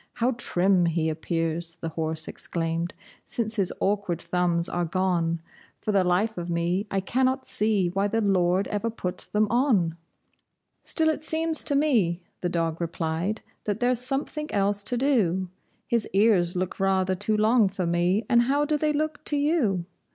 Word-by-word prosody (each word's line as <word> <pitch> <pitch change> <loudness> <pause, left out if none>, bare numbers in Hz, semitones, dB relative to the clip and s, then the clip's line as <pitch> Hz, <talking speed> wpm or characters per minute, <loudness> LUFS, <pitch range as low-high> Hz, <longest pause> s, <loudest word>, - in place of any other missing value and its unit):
"How 240 +2 +1
trim 190 -6 +2
he 165 -1 0
appears," 165 +1 -2
the 165 -1 -5
horse 160 0 -1
exclaimed, 165 0 -3 0.3
"since 230 -1 -2
his 190 -3 +1
awkward 195 -4 0
thumbs 175 -2 0
are 175 - -1
gone! 170 -2 0 0.4
For 215 - -2
the 195 -2 +3
life 185 +4 +1
of 175 0 -5
me 175 +4 0
I 195 - 0
cannot 260 +5 0
see 210 -4 +2
why 195 +3 0
the 225 +2 0
Lord 190 -2 +2
ever 210 +2 -1
put 180 -5 -5
them 210 +1 +3
on!" 230 - +2 0.9
"Still 320 -1 +2
it 310 -1 -2
seems 320 0 +1
to 285 - +2
me," 215 - +2 0.2
the 175 - 0
dog 165 -1 -1
replied, 170 +5 -2 0.2
"that 210 0 -1
there's 245 -1 +2
something 285 +4 -1
else 200 0 +1
to 245 - +1
do; 195 -9 +1 0.4
His 235 -2 -1
ears 195 -4 +3
look 180 0 -3
rather 190 -1 +2
too 205 +3 0
long 215 -1 +4
for 190 -1 -3
me, 175 +5 +1
and 235 -2 +5
how 280 +4 +1
do 300 0 +1
they 305 0 +1
look 305 0 -2
to 295 - -1
you?" 280 - +1
195 Hz, 170 wpm, -26 LUFS, 175-235 Hz, 0.9 s, and